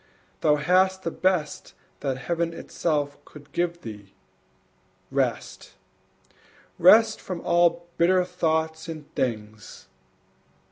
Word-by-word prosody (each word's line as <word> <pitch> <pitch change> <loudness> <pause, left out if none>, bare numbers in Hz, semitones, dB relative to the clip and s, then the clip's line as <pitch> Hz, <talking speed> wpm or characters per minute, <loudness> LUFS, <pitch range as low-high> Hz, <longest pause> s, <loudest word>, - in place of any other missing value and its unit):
thou 150 -2 +3
hast 185 +5 +2
the 165 - -2
best 180 -5 -1 0.2
That 135 -3 -2
Heaven 165 +5 -2
itself 145 -5 -2
could 145 -1 -15
give 170 +1 -2
thee, 105 -3 -10 1.0
rest, - - -2 1.0
Rest 220 +5 +6
from 185 -2 -5
all 170 0 +2
bitter 180 +2 +3
thoughts 160 -2 -1
and 155 -3 -9
things! 110 -3 -4
165 Hz, 100 wpm, -25 LUFS, 145-175 Hz, 1.0 s, Rest